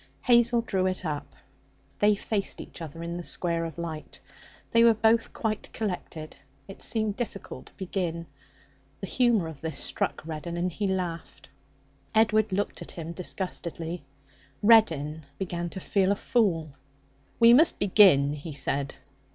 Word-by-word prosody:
Hazel 240 -1 +4
drew 190 -5 0
it 185 0 -3
up. 145 -2 -4 0.6
They 210 0 +4
faced 200 0 -3
each - - -10
other 165 +1 -7
in 170 +1 -4
the 175 - -5
square 170 -1 -1
of 165 -1 -7
light. 160 -2 -6 0.5
They 230 0 +5
were 230 -1 +6
both 225 +1 +3
quite 215 -2 -3
collected. 180 -6 -5 0.3
It 195 - -11
seemed 215 -3 0
difficult 240 0 -6
to - - -15
begin. 175 -3 -3 0.7
The - - -5
humour 230 -5 +2
of 160 -4 -9
this 160 -3 -4
struck - - -1
Reddin, 165 +2 -5
and 180 +1 -1
he 200 +4 -2
laughed. 180 -3 -4 0.7
Edward 215 -1 +3
looked 200 +2 -2
at - - -8
him 165 -1 -6
disgustedly. 170 -2 -5 0.6
Reddin 160 -9 +4
began 175 -2 -3
to 190 - -6
feel 195 +1 +1
a - - +2
fool. 180 - +1 0.7
'We 230 0 +8
must 310 +6 +6
begin,' 185 -8 +5
he 150 +2 -7
said. 140 0 -1
185 Hz, 150 wpm, -27 LUFS, 165-215 Hz, 0.7 s, We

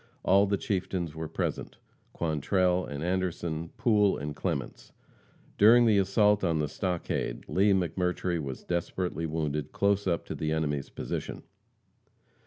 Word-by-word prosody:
All 100 +2 +5
the 100 0 +1
chieftains 95 -5 -2
were 80 0 -5
present, - - -3 0.3
Quantrell 90 +3 +1
and 70 +1 -5
Anderson, 85 -3 -2
Poole 105 -4 +3
and 75 +1 -5
Clements. 75 -7 -4 0.7
During 120 +4 +7
the 105 -3 +4
assault 105 +1 +3
on 85 -3 +1
the 75 -1 0
stockade, 85 - -3
Lee 100 +2 +3
McMurtry 90 -1 0
was 70 -3 -6
desperately 85 -1 -2
wounded 75 -2 -2
close 100 0 +1
up 85 -2 0
to - - -5
the 75 0 -2
enemy's 75 -3 -1
position. - - -5
90 Hz, 135 wpm, -29 LUFS, 80-100 Hz, 0.7 s, During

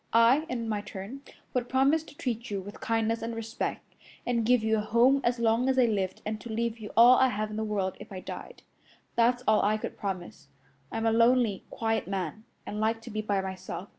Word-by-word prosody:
I, 240 +7 +5
in 235 -2 -3
my 210 -2 -1
turn, 205 +6 -8 0.3
would 245 -1 -1
promise 275 +4 +3
to 290 - -15
treat 240 -1 -3
you 200 -1 -2
with 200 +2 -9
kindness 225 0 0
and 230 0 -4
respect, 225 +1 -4 0.3
and 235 -2 +1
give 240 0 +3
you 220 0 +2
a - - 0
home 240 +6 +4
as 240 +1 +1
long 235 +2 +2
as 265 - +1
I 255 - +6
lived 195 -4 -1
and 215 0 -3
to 235 - -7
leave 230 +1 -2
you 210 -2 -7
all 240 +2 +8
I 260 - +5
have 215 -2 -2
in - - -5
the 220 - -1
world 200 -3 -2
if - - -11
I 190 - -5
died. 485 - -9 0.5
That's 245 +1 +3
all 215 0 +5
I 215 +1 +2
could - - -6
promise. 180 -7 -5 0.4
I'm 225 - -2
a 225 - +4
lonely, 230 -3 +3
quiet 225 -3 -1
man, 195 +2 -4 0.2
and 210 - -5
like 225 +1 +1
to 240 - -8
be 215 0 -2
by 205 -2 0
myself. 190 0 -6
225 Hz, 225 wpm, -28 LUFS, 210-240 Hz, 0.5 s, all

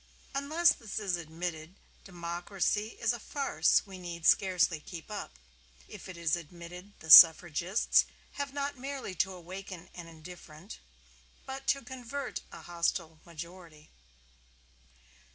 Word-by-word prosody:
Unless 310 +5 +3
this 225 -4 -8
is 200 -4 0
admitted, 165 0 -6 0.3
democracy 180 +4 -3
is 230 +1 +1
a 240 - -6
farce 270 - +1
we 190 -2 -10
need 170 -2 -7
scarcely 180 -4 +3
keep 165 +5 -10
up. 205 - -6 0.5
If 200 -2 -11
it 185 - -8
is 165 -1 +1
admitted, 175 +4 -10
the 160 - -2
Suffragists 175 +5 +7 0.3
have 285 -1 -4
not 280 -1 -4
merely 270 -6 -5
to 190 +1 0
awaken 185 0 -9
an 175 -1 -9
indifferent, 165 +1 -12 0.7
but 270 0 -7
to 275 - +2
convert 260 +2 -6
a - - -11
hostile 170 -2 -2
majority. 170 -2 -11
180 Hz, 125 wpm, -31 LUFS, 170-220 Hz, 0.7 s, Suffragists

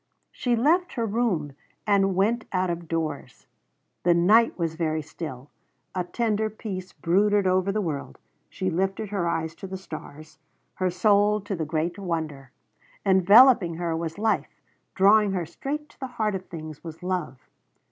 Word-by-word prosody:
She 245 -2 0
left 335 +9 +2
her 230 -3 -1
room 200 - -1 0.3
and 195 -2 +3
went 220 +5 +1
out 185 -2 0
of 170 -1 -5
doors. 155 -6 -4 0.6
The 175 -1 +3
night 215 +7 +4
was 165 -3 -1
very 160 -1 -1
still. 145 -3 -8 0.4
A 185 - -1
tender 220 +3 -1
peace 195 -4 -6
brooded 200 +3 +2
over 185 +1 +2
the 215 +1 -1
world. 145 - -4 0.3
She 185 -1 -2
lifted 195 +4 -1
her 195 -4 -1
eyes 160 -1 -2
to 195 - -9
the 190 0 -5
stars 155 -3 -10 0.3
her 185 -1 0
soul 205 +3 +3
to 200 0 -4
the 160 -3 -3
great 160 +4 -2
Wonder. 160 -7 -4 0.6
Enveloping 195 0 +6
her 170 -1 -2
was 165 0 -4
Life 220 +1 -1 0.4
drawing 200 +1 +5
her 180 -3 -1
straight 295 - -5
to - - -23
the 265 - -4
heart 215 -2 +1
of 190 -1 -5
things 155 -3 -8
was 165 +1 -9
Love. 180 -7 -2
185 Hz, 160 wpm, -25 LUFS, 165-210 Hz, 0.6 s, Enveloping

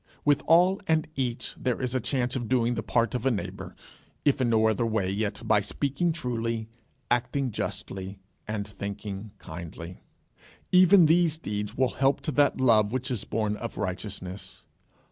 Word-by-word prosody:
With 145 -1 +4
all 180 +5 +5
and 160 -1 +2
each 125 -3 -2
there 125 -2 -1
is 125 -1 -2
a 130 - +1
chance 125 +1 -1
of 120 -3 -2
doing 120 -2 +2
the 115 - -2
part 115 +2 +1
of 125 -3 -2
a - - +5
neighbour, 110 -6 -4 0.5
if 140 -2 +3
in 120 - +2
no 110 -1 +4
other 110 +1 +1
way 110 -5 0
yet 105 +1 -2
by 105 -2 +4
speaking 140 - -1
truly, 115 -7 -3 0.4
acting 125 +2 +1
justly, 95 -1 -5 0.3
and 105 -1 -3
thinking 100 0 -6
kindly. 85 +1 -9 0.7
Even 185 0 +7
these 165 0 +3
deeds 105 -5 -4
will 130 -1 +3
help 135 +1 +4
to 155 - -2
that 145 0 +3
love 110 -5 +4
which 130 +1 -2
is 120 -5 -2
born 105 -1 -1
of 115 +1 -6
righteousness. 95 -1 -5
115 Hz, 165 wpm, -27 LUFS, 105-135 Hz, 0.7 s, Even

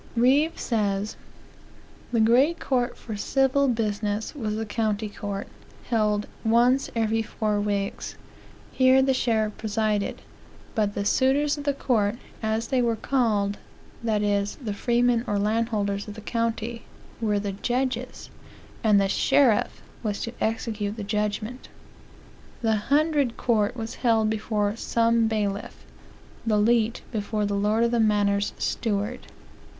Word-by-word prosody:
Reeve 275 +7 +3
says: 205 -3 -1 1.0
"The 235 - +2
great 255 +9 +4
court 250 -2 0
for 220 - -7
civil 270 +5 +2
business 210 -3 -1
was 220 -8 -3
the 225 +1 -2
county 215 -1 -1
court; 205 -1 -5 0.4
held 210 -2 +2 0.2
once 240 +4 +3
every 225 0 +1
four 210 -1 -1
weeks. 200 -1 -2 0.6
Here 260 0 +5
the 265 0 +3
sheriff 220 -4 0
presided; 215 -1 -1 0.5
but 210 -2 0
the 200 - -2
suitors 275 +6 +2
of 290 - -7
the 285 -1 +1
court, 220 -6 +1 0.3
as 220 +1 -1
they 260 -2 +2
were 235 -1 +1
called, 215 -5 0 0.4
that 215 -2 +1
is, 205 0 0
the 225 -8 -5
freemen 240 +2 +2
or 205 -2 0
landholders 210 -1 0
of 210 - -7
the 220 - -9
county, 230 +1 -2 0.4
were 210 -2 +1
the 200 0 -2
judges; 250 +4 -3 0.5
and 210 -2 +5
the 195 - +2
sheriff 230 +3 +2 0.2
was 210 -3 -2
to 230 - -4
execute 220 -2 -1
the 215 - -4
judgment. 210 +4 -3 0.9
"The 220 -1 +3
hundred 290 -4 +2
court 225 -1 +1
was 225 0 -4
held 225 -3 +3
before 210 -1 -1
some 230 -1 +2
bailiff; 210 -2 -3 0.6
the 220 -2 +2
leet 225 +1 +2
before 210 -1 -1
the 205 - -1
lord 210 +3 +2
of 235 - +2
the 240 - +1
manor's 205 -2 +2
steward. 215 +2 -2
220 Hz, 135 wpm, -25 LUFS, 210-240 Hz, 1.0 s, Here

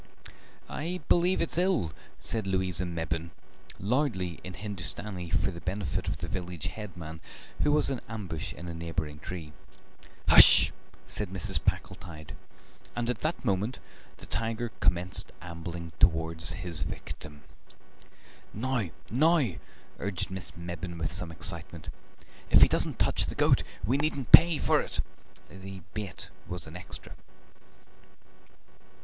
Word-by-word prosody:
"I 175 +4 -3
believe 180 +2 +4
it's - - +1
ill," 180 - +1 0.3
said 110 -4 -2
Louisa 95 -1 +1
Mebbin, 80 -1 -3 0.5
loudly 100 - 0
in 90 0 -7
Hindustani, 95 -2 -4
for - - +1
the 85 - -9
benefit 95 -2 -2
of - - -1
the - - -5
village 90 -3 -5
headman, 85 -7 -8 0.4
who 150 - +3
was 150 -1 +3
in 130 - -2
ambush 95 -5 -4
in 90 - -8
a 85 - -4
neighbouring 80 -3 -4
tree. 80 -2 -7 0.7
"Hush!" - - +10 0.3
said 105 -3 -3
Mrs. 95 -3 0
Packletide, 85 -4 -3 0.6
and 120 0 0
at - - -5
that 155 -3 -2
moment 105 +4 0 0.4
the - - -9
tiger 115 +1 -1
commenced 90 0 +1
ambling 85 0 -6
towards 80 -1 +3
his 85 -4 -2
victim. 75 0 -6 1.1
"Now, 120 -3 0 0.2
now!" 150 - +4 0.5
urged 95 -3 -2
Miss 95 -2 -4
Mebbin 85 0 -5
with 80 0 -2
some 90 -1 0
excitement; 85 -1 -5 0.6
"if - - +8
he - - +10
doesn't - - +2
touch - - +2
the - - -4
goat - - +4 0.2
we 125 +6 +2
needn't 140 -3 -1
pay 170 -2 +10
for - - +3
it." - - -5 0.5
(The 95 -1 -9
bait 105 -4 -6 0.2
was 90 -2 -4
an 80 - -10
extra.) 90 - -7
90 Hz, 130 wpm, -29 LUFS, 85-110 Hz, 1.1 s, Hush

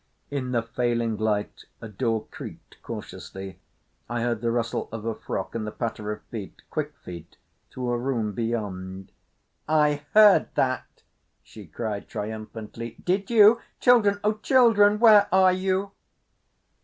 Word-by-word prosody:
In 130 -3 -3
the 120 -2 +1
failing 115 -1 -1
light 105 -1 -2
a 115 - -8
door 110 +1 -2
creaked - - -11
cautiously. 95 0 -8 0.5
I 120 0 -2
heard 120 -2 -1
the 120 - 0
rustle 115 -1 -2
of 110 -1 -6
a 115 - -1
frock - - -5
and 110 -2 -3
the - - -4
patter 110 -2 -4
of 105 0 -7
feet—quick 145 +7 -6
feet 85 -2 -10 0.3
through 125 -1 -4
a 120 - 0
room 120 -4 -1
beyond. 95 -5 -4 0.6
"I 150 -1 +2
heard 210 -2 +7
that," 130 -1 -2 0.4
she 105 -4 -13
cried 105 +4 -5
triumphantly. 110 +2 -6
"Did 190 +2 0
you? 225 0 +6 0.2
Children, 215 -5 +4
O 210 +1 0
children, 215 -4 +5
where 215 -3 +7
are 185 0 +5
you?" 190 +1 -1
120 Hz, 140 wpm, -25 LUFS, -, 0.6 s, heard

